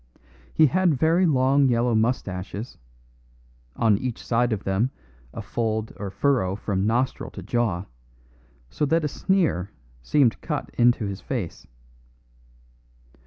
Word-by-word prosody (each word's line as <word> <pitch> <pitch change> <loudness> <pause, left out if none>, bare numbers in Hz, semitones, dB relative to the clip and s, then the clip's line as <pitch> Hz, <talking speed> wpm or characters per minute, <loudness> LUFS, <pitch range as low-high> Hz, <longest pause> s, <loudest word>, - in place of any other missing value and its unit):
He 160 - +5
had 175 +1 +2
very 165 +6 +3
long 135 -1 +3
yellow 120 -1 +2
moustaches; 110 -2 -2 1.0
on 105 -3 +3
each 125 -3 -5
side 120 +1 +1
of 105 -2 -2
them 95 +6 +1 0.4
a - - -7
fold 110 -1 -2
or 100 +1 -5
furrow 100 -2 +1
from 100 -1 -1
nostril 125 +4 0
to - - -9
jaw, 105 -7 -1 0.9
so - - -3
that 165 +2 +2
a - - +2
sneer 155 - 0 0.3
seemed 130 - +2
cut - - -4
into 120 -2 +3
his 100 -1 -5
face. 115 -11 -5
120 Hz, 125 wpm, -24 LUFS, 100-135 Hz, 1.0 s, He